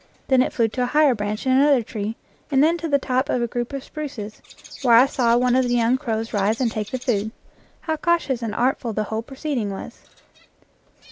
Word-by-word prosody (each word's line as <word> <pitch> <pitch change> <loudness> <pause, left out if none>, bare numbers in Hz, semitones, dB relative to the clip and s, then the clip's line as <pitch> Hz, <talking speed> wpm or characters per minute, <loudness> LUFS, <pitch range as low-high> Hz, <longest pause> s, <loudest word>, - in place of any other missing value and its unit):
Then 260 -1 +5
it - - 0
flew 230 -2 +1
to 250 - -4
a 245 - +1
higher 295 0 +4
branch 210 0 -4
in 260 - +2
another 270 -1 +4
tree, 215 0 -5 0.3
and 275 -1 +3
then 325 +2 +4
to 330 - -3
the 285 - +4
top 260 0 -1
of - - +1
a 240 - +1
group 240 +2 -4
of 275 -1 -5
spruces, 245 -10 -7 0.4
where 245 -4 +5
I 245 +3 +8
saw 240 -4 +2
one 250 0 +2
of 260 0 +3
the 245 - +1
young 235 +1 +3
crows 225 -4 -3
rise 205 +2 +1
and 245 -4 +1
take 215 -2 -4
the 260 - -3
food. 220 -4 -1 0.5
How 315 -1 -2
cautious 305 -6 0
and 220 -2 -4
artful 245 -1 0
the 215 - -1
whole 220 +1 -3
proceeding 265 -3 -3
was 195 - -8
245 Hz, 220 wpm, -22 LUFS, 225-270 Hz, 0.5 s, I